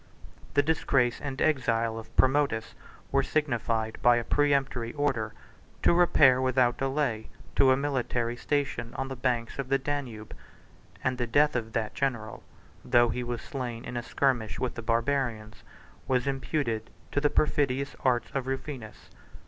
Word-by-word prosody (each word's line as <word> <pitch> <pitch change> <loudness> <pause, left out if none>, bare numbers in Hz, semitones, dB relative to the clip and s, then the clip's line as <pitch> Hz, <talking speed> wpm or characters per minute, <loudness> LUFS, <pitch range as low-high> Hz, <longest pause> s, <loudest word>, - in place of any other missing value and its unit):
The 145 - +5
disgrace 135 -5 +1
and 135 -2 -5
exile 115 -6 +1
of 115 - -13
Promotus 130 -4 +2 0.4
were 140 - +3
signified 115 -7 -1
by 120 0 +6
a 120 - 0
peremptory 135 -4 +1
order, 130 -7 -1 0.5
to - - +5
repair, 145 -7 +5
without 130 -1 +2
delay, 135 -5 -1 0.3
to 135 - +5
a 130 - +5
military 125 -4 -1
station 120 -3 -2
on 135 0 -3
the 135 - -4
banks 125 -1 -1
of 135 -2 -3
the 135 - +4
Danube; 135 -6 -5 0.7
and 130 0 0
the 120 - 0
death 145 +5 +3
of 110 -2 -3
that 110 -2 -1
general 115 -6 -2 0.4
(though 120 0 +4
he 125 +2 -2
was 120 -1 -4
slain 125 -4 -5
in - - -6
a 120 - -1
skirmish 120 -6 0
with 130 - -1
the 115 - -6
Barbarians) 115 -2 -1 0.4
was 125 -1 +1
imputed 135 -5 -2 0.2
to 145 - 0
the 145 - +3
perfidious 140 -3 +1
arts 125 -2 +1
of 135 -2 -2
Rufinus. 135 -4 -6
130 Hz, 155 wpm, -28 LUFS, 115-140 Hz, 0.7 s, by